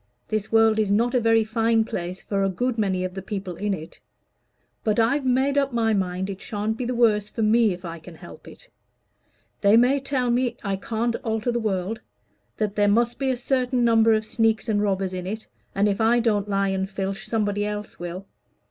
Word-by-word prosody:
This 215 -1 -2
world 225 -1 +4
is 215 -2 +1
not 230 +5 +2
a 250 - +3
very 225 -1 +3
fine 225 0 +1
place 180 -2 -5
for 195 -1 -1
a 195 - +2
good 245 +6 -1
many 190 -3 0
of 185 0 -4
the 190 - -6
people 195 -2 -5
in 210 0 -1
it. 160 -2 -11 0.8
But 215 0 +1
I've 260 +5 +2
made 270 +3 +2
up 275 -2 -1
my 225 -2 +2
mind 190 -1 -1
it 195 -1 -7
shan't 215 -2 -3
be 245 - -4
the 250 +1 -2
worse 210 -3 +2
for 225 - -3
me, 220 0 +4
if 180 0 -7
I 170 0 -6
can 165 +1 -12
help - - -13
it. - - -14 0.9
They 205 +2 +5
may 255 +4 +4
tell 260 -3 -1
me 245 0 0
I 200 -2 -1
can't 230 +4 -2
alter 225 +1 -2
the 240 - -1
world 210 0 -2 0.6
that 210 -2 -1
there 205 0 +3
must 235 +3 +2
be 270 -1 0
a 255 - 0
certain 250 -1 0
number 225 -1 +5
of 215 0 0
sneaks 225 0 +1
and 210 -2 +1
robbers 195 -2 -1
in 180 0 -5
it, 215 +3 -5 0.3
and 200 +1 +3
if 205 +2 0
I 230 +2 +4
don't 210 -3 0
lie 195 0 +1
and 190 0 -2
filch 195 +2 -4
somebody 205 -2 0
else 210 0 -5
will. 175 +2 -6
215 Hz, 215 wpm, -24 LUFS, 195-235 Hz, 0.9 s, They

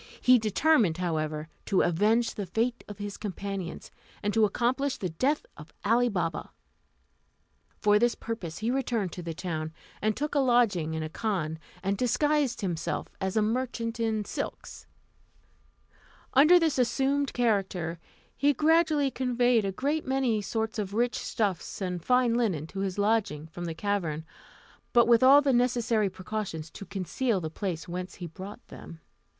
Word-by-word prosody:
He 255 -1 +6
determined, 215 - +3
however, 155 -3 -2 0.2
to 195 - +3
avenge 210 +7 +2
the 200 -3 -5
fate 230 +6 -1
of 205 - -8
his 205 -1 -5
companions, 195 -3 -5 0.3
and 205 0 0
to 225 -1 +5
accomplish 255 +6 0
the 185 - -3
death 270 - 0
of 150 +1 -12
Ali 240 +3 +3
Baba. 170 -6 -2 1.3
For 210 0 +4
this 240 +1 +2
purpose 185 -8 -5
he 225 +3 -1
returned 235 -8 -1
to 180 - -7
the 165 -1 -5
town, 160 -3 -4 0.3
and 215 0 0
took 295 +3 -2
a 290 - +3
lodging 225 - +2
in 160 - -2
a - - -3
khan, 160 -4 -2 0.2
and 195 +1 -1
disguised 280 0 +1
himself 175 -4 -2
as 190 +2 -1
a 215 - +4
merchant 230 0 -2
in 220 -2 0
silks. - - -6 1.5
Under 305 +7 +7
this 320 -5 +1
assumed 270 +3 +1
character, 190 -8 0 0.4
he 290 +1 +3
gradually 310 -2 +3
conveyed 245 -3 +2
a 195 - 0
great 285 +10 -1
many 260 -5 +1
sorts 220 +2 -2
of 200 -1 -3
rich 240 +2 +1
stuffs 200 -6 -2
and 180 -3 -3
fine 250 -2 +3
linen 205 -11 0
to 195 +4 -8
his 195 -1 -2
lodging 205 -8 +1
from 170 +2 -7
the 165 -1 -4
cavern, 165 -5 -2 0.7
but 235 -1 +6
with 235 -1 +5
all 275 +3 +8
the 275 -2 +3
necessary 240 -4 +2
precautions 185 -4 -5
to 200 - -10
conceal 205 +3 -1
the 160 -3 -5
place 180 -3 -4
whence 180 +1 -5
he 180 - -7
brought 190 +7 -9
them. 165 - -11
215 Hz, 160 wpm, -28 LUFS, 180-245 Hz, 1.5 s, all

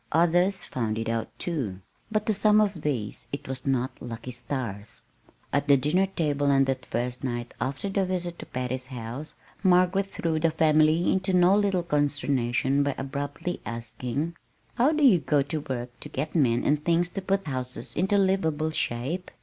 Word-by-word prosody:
Others 175 +4 +3
found 110 -4 -2
it 115 0 -2
out, 115 -1 -1
too; 130 - -3 0.3
but 215 -1 0
to 215 - +2
some 210 +1 +4
of 200 -6 +1
these 125 -9 -3
it 140 - -5
was 130 0 -5
not 130 -1 -1
"lucky" 115 +1 -6
stars. 120 -4 -4 0.5
At 140 +1 +1
the 140 -1 +7
dinner 170 +8 +2
table 145 -6 0
on 135 -1 +5
that 135 -1 -2
first 125 +2 -3
night 120 -2 -3
after 135 +8 -2
the 195 -1 0
visit 175 -2 -3
to - - -8
Patty's 125 0 -3
house, 125 +4 -7 0.3
Margaret 185 +1 +4
threw 165 -4 -1
the 165 +1 +3
family 155 +1 +3
into 190 0 0
no 180 +2 +5
little 200 -3 +2
consternation 140 -3 +1
by 140 -1 0
abruptly 145 +6 -4
asking: 120 +7 -4 0.4
"How 255 +6 +3
do 305 -1 +1
you 220 -11 +7
go 145 -3 +2
to 155 +3 -3
work 125 -1 -3
to - - -9
get 150 +4 -3
men 125 -7 +3
and 150 0 +1
things 170 +1 +2
to 195 - -5
put 195 +1 0
houses 130 -3 -3
into 190 +4 +2
livable 160 -6 +1
shape?... 155 +6 -2
150 Hz, 175 wpm, -27 LUFS, 130-180 Hz, 0.5 s, the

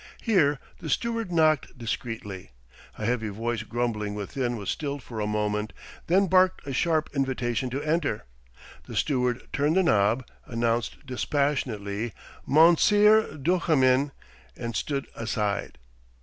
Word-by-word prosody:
Here 160 -11 +3 0.2
the - - -6
steward 230 -5 -1
knocked 155 -5 +2
discreetly. 115 - -5 0.5
A 110 - -4
heavy 115 -2 0
voice 115 +2 -2
grumbling 110 -3 -2
within 120 +4 -2
was 100 -3 -3
stilled 140 -3 -4
for 115 -3 -7
a 105 - -1
moment, 105 0 -1 0.3
then 190 +4 +4
barked 185 0 +3
a 140 - -4
sharp 155 +3 +1
invitation 130 -3 -1
to 135 +4 -3
enter. 155 -8 0 0.6
The - - -8
steward 125 -3 0
turned 145 +3 +2
the 190 - +5
knob, 110 - +2 0.2
announced 115 +1 -1
dispassionately 120 -5 -1 0.3
"Monseer 205 +7 +5
Duchemin," 145 -4 +2 0.5
and 115 -1 -5
stood 140 -2 -2
aside. 105 -3 -2
130 Hz, 125 wpm, -26 LUFS, 110-155 Hz, 0.6 s, the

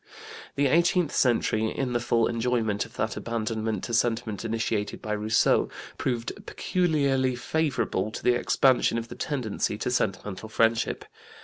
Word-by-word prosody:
The 140 - +2
eighteenth 170 +3 +3
century, 110 -3 +2
in 130 0 -2
the 120 - +2
full 120 -1 +2
enjoyment 115 -3 0
of - - -20
that - - -1
abandonment 110 -1 -2
to 120 - -4
sentiment 115 -3 0
initiated 115 -2 -2
by 110 - -6
Rousseau, 105 +1 +2 0.3
proved 120 -2 -1 0.2
peculiarly 140 -8 +1
favorable 125 -7 -1
to 110 - -7
the 125 - +4
expansion 125 0 +3
of 115 0 -4
the - - -8
tendency 115 -7 -2
to 125 - -2
sentimental 105 -2 -2
friendship. 115 +1 +1
115 Hz, 140 wpm, -27 LUFS, 110-130 Hz, 0.3 s, the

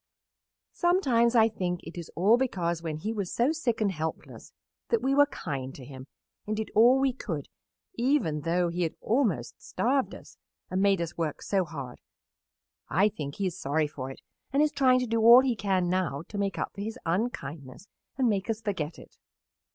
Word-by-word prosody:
Sometimes 255 -10 +2
I 225 -1 +6
think 180 -5 -3
it 165 - -10
is 170 -2 -7
all 195 +7 +5
because 175 -10 -1
when 160 -2 -4
he 215 +8 -3
was 200 -5 -3
so 245 +5 +2
sick 260 -8 -1
and 205 -2 +2
helpless 160 -2 -6 0.4
that 460 - +1
we 270 - +2
were 285 +1 +6
kind 135 - -5
to 130 - -10
him 130 -1 -10 0.4
and 215 0 -2
did 220 - -4
all 240 +5 +6
we 270 -1 +2
could 165 - -5 0.5
even 235 - +1
though 175 +3 +1
he 175 +1 -3
had 165 -2 -1
almost 210 - 0
starved 265 +2 0
us - - -14 0.3
and 185 +1 0
made 195 -3 +3
us 170 0 -5
work 155 -3 -2
so 195 -2 +1
hard. 140 -6 -8 0.9
I 195 +5 +3
think 150 -9 -6
he 200 - -2
is 185 -1 -3
sorry 150 +3 +1
for 135 -3 -6
it 135 - -10 0.3
and 280 +2 +3
is 305 - +2
trying 260 -3 +3
to - - 0
do 230 -1 0
all 235 +3 +9
he 260 -3 0
can 195 -4 0
now 175 -6 -1
to 210 - -6
make 200 -1 -1
up - - -3
for 200 - -7
his 220 +4 -4
unkindness 165 - -3 0.3
and 260 -2 +2
make 200 -1 0
us 220 -1 -1
forget 185 -8 -3
it." - - -16
195 Hz, 200 wpm, -28 LUFS, 160-235 Hz, 0.9 s, all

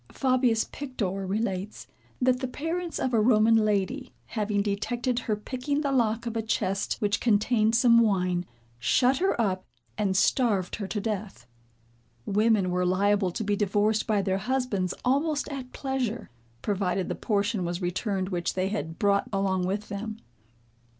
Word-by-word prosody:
Fabius 255 -4 +2
Pictor 195 -9 -4
relates, 200 0 -3 0.3
that 255 0 +2
the 260 - -2
parents 330 +6 -3
of 255 - -1
a 225 - +4
Roman 220 0 +5
lady, 215 +5 0
having 210 -2 -1
detected 240 +5 -1
her 220 -3 -1
picking 255 +7 -3
the 280 -2 0
lock 235 -3 +1
of 230 -1 -4
a 225 - 0
chest 195 -3 -1
which 205 -1 0
contained 220 0 +2
some 235 -1 +6
wine, 185 -5 +1 0.3
shut 255 - +3
her 380 -8 +1
up 190 -4 0 0.4
and 195 -3 +1
starved 200 -3 +2
her 205 -4 -4
to 210 - -2
death. 200 - -4 0.8
Women 210 -2 +2
were 180 0 +1
liable 195 +2 +2
to 180 - -4
be 205 -1 +1
divorced 210 +2 +1
by 210 -3 +2
their 190 0 0
husbands 215 -5 -1
almost 285 +4 +1
at 265 -3 -6
pleasure, 255 - -3 0.3
provided 190 -2 0
the - - -2
portion 205 -1 0
was 175 0 -2
returned 185 +1 -2
which 175 -3 -2
they 185 +1 0
had 170 -6 -4
brought 200 -1 +2
along 190 -2 0
with 200 +2 -3
them. 215 +1 -5
210 Hz, 155 wpm, -27 LUFS, 195-245 Hz, 0.8 s, some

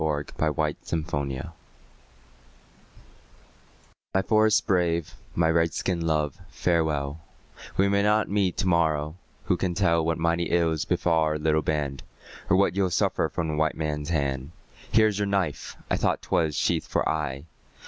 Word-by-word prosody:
A 75 -2 0
CRY 75 0 -1
FROM 80 -2 -2
AN 70 - +1
INDIAN 65 - -5
WIFE - - -9 2.7
My 95 - +4
forest 110 0 +3
brave, 85 -4 +1 0.2
my 85 -1 +3
Red 85 0 +1
skin 90 -3 -1
love, 75 -3 0
farewell; 80 -4 0 0.6
We 100 - +4
may 100 0 +2
not 105 +1 +2
meet 100 -3 0
to 95 - 0
morrow; 80 -3 +1 0.3
who - - +1
can 90 -2 -1
tell 85 -3 +2
What 80 0 0
mighty 85 +1 +1
ills 80 -4 +1
befall 85 -2 +1
our 75 0 0
little 80 0 +1
band, 70 -4 -2 0.5
Or 90 - +5
what 95 -3 +2
you'll 95 -2 +2
suffer 85 - +1
from 85 - -2
the 75 - -2
white 80 0 0
man's 75 -1 -3
hand? 70 -4 -1 0.4
Here 110 0 +5
is 105 -2 0
your 100 - 0
knife! 95 -7 -2
I - - +3
thought - - 0
'twas 80 -3 0
sheathed - - 0
for - - 0
aye. 75 -3 -2
80 Hz, 165 wpm, -26 LUFS, 75-90 Hz, 2.7 s, Or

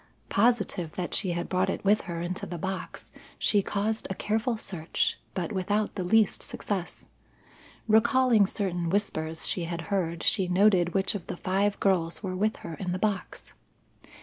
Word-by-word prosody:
Positive 200 -7 +1
that 180 -2 -4
she 185 -4 0
had 170 0 -3
brought 185 +1 +1
it 195 - -3
with 210 +2 +4
her 170 -1 -3
into 180 +1 -4
the 175 - -5
box, 190 +3 -5 0.3
she 205 - +2
caused 210 +3 -1
a 190 - -3
careful 220 +4 0
search, 175 -6 -2 0.2
but 185 +2 -2
without 205 +2 0
the 190 - -3
least 215 +3 +3
success. 190 -4 -4 0.8
Recalling 230 -1 +4
certain 180 -5 -2
whispers 165 -5 -1
she 175 - -1
had 170 0 -4
heard, 170 -3 -1
she 190 -4 +3
noted 180 -1 +3
which 195 0 +2
of 200 -5 -6
the - - -5
five 200 +3 0
girls 180 -2 +1
were 185 -2 -3
with 215 +4 +1
her 165 - -5
in 180 +2 -3
the - - -1
box. 200 -1 -3
190 Hz, 170 wpm, -28 LUFS, 175-210 Hz, 0.8 s, with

